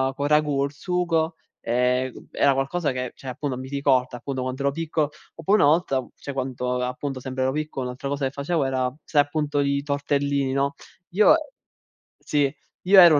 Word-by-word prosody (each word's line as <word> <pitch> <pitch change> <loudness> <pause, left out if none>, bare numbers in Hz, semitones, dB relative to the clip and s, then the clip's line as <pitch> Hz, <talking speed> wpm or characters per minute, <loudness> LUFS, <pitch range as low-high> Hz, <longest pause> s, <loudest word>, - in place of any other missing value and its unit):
con 145 - -2
il 150 - -1
ragù 150 -2 +3
il 140 - -5
sugo, 165 0 0 0.3
ehm, 125 +2 0
era 140 -1 +3
qualcosa 135 +3 0
che 125 -1 -3
cioè 135 - -12
appunto, 130 0 -3
mi 130 - -6
ricorda 130 -3 +1
appunto, 130 +1 -4
quando 130 +1 -3
ero 140 - +3
piccolo. 155 -1 -1 0.2
Oppure 195 +6 +2
una 145 - +6
volta, 150 -5 +2
cioè 140 - -7
quando, 125 -1 -2
appunto, 130 +2 -3
sempre 130 0 -3
ero 130 - +2
piccolo, 150 -3 -3
un'altra 125 +2 -5
cosa 140 0 -1
che 130 - -1
facevo 145 +2 -1
era: 130 -1 0
sai, 145 -2 +3
appunto 145 0 -1
i 140 0 +1
tortellini, 140 -1 0
no, 140 +1 +1 0.4
io 210 - +6 0.9
sì, 145 -2 +1 0.3
io 190 +1 +8
ero 170 -4 +9
140 Hz, 180 wpm, -24 LUFS, 130-150 Hz, 0.9 s, ero